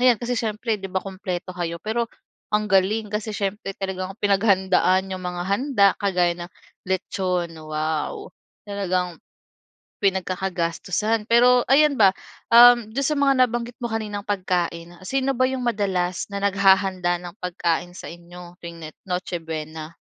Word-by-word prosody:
ayan, 250 -2 +5
kasi 245 +1 -2
siyempre 220 0 -1
'di 195 - -6
ba, 190 - 0
kumpleto 185 -1 -5
kayo? 170 -1 -3
Pero 230 +3 -1 0.4
ang 210 0 +1
galing, 205 +3 +2
kasi 215 +1 -3
siyempre 195 0 -3
talagang 190 -1 -4
pinaghandaan 190 -2 +3
yung 185 -1 -5
mga 180 0 -3
handa 205 -1 +3
kagaya 180 -3 +2
ng 175 - -22 0.4
litson, 185 -2 -1
wow! 155 0 -3 0.4
Talagang 185 -4 -2 0.8
pinagkakagastusan. 190 +2 -1
Pero 245 +1 +5
ayan 285 0 +5
ba, 195 -2 +6 0.4
uhm, 240 -2 +7
do'n 275 +3 -1
sa 300 +1 +1
mga 280 -1 +4
nabanggit 240 0 -4
mo 235 - -2
kaninang 210 -2 -3
pagkain, 175 -3 -2
sino 270 +5 0
ba 255 - +2
yung 260 -1 -3
madalas 190 -6 -1
na 200 - -3
naghahanda 190 -2 +3
ng 175 +1 -9
pagkain 175 -1 -1
sa - - -9
inyo 175 +1 -12
tuwing 170 0 -8
ne 155 - -7 0.2
Noche 180 -1 -3
Buena? 160 0 -6
195 Hz, 145 wpm, -23 LUFS, 180-220 Hz, 0.8 s, uhm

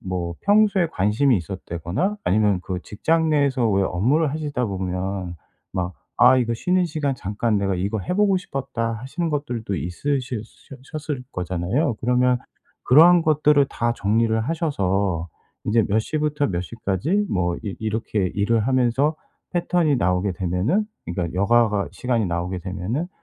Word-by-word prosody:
뭐 90 -2 -3
평소에 205 -3 +4
관심이 115 - +2
있었다거나 90 - -3
아니면 105 -2 +2
그 90 -1 -4
직장 160 +9 0
내에서 140 -5 +2
왜 100 0 +2
업무를 130 - +1
하시다 145 -4 -2
보면 95 -1 -3 0.4
막 90 0 -2 0.2
'아 130 0 +6
이거 115 -2 0
쉬는 180 +8 +1
시간 150 -4 -1
잠깐 105 0 -1
내가 95 -1 0
이거 100 +4 -1
해 180 - -3
보고 200 -2 +3
싶었다' 125 -8 -3
하시는 135 +9 -3
것들도 120 -8 -3
있으실 125 - -2
셔 135 - -15 0.2
셨을 150 -4 -4
거잖아요. 90 - -1
그러면 125 +1 +2 0.5
그러한 170 +6 +7
것들을 150 -2 +4
다 120 0 -1
정리를 110 +1 +1
하셔서 100 - -1 0.4
이제 110 0 +3
몇 105 +2 +1
시부터 150 +4 0
몇 90 -1 -2
시까지 115 - -1
뭐 85 -2 0
이 100 - -4
이렇게 110 -3 -1
일을 110 +3 +2
하면서 130 +4 +2 0.4
패턴이 170 -4 +2
나오게 90 0 +1
되면은 95 - 0 0.2
그러니까 85 0 -3
여가가 105 0 +2
시간이 120 -4 0
나오게 90 +1 -3
되면은 100 - -3
115 Hz, 330 characters per minute, -23 LUFS, 95-145 Hz, 0.5 s, 그러한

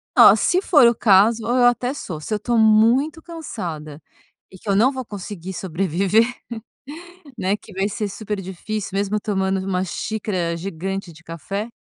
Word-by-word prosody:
Oh, - - +8
se 365 +1 +2
for 295 -10 +5
o 235 - +4
caso, 215 +1 +4
eu 245 +1 +2
até 245 +2 +2
sou. 165 - -6
Se 215 +8 -3
eu - - +1
estou 235 +3 -1
muito 230 +9 +3
cansada 175 - -7 0.5
e 190 - -14
que 210 - -12
eu 200 - +2
não 250 +7 +4
vou 260 -3 -6
conseguir 190 -2 -7
sobreviver, 190 +4 +1 1.1
né, 195 +2 0
que 215 - -16
vai 195 +2 -1
ser 210 0 -3
super 210 0 -5
difícil, 195 +3 -5
mesmo 205 +1 0
tomando 190 -2 -1
uma 185 -1 -1
xícara 185 -3 -3
gigante 190 +1 -5
de 165 +1 -17
café. 195 +7 -6
200 Hz, 165 wpm, -21 LUFS, 185-225 Hz, 1.1 s, Oh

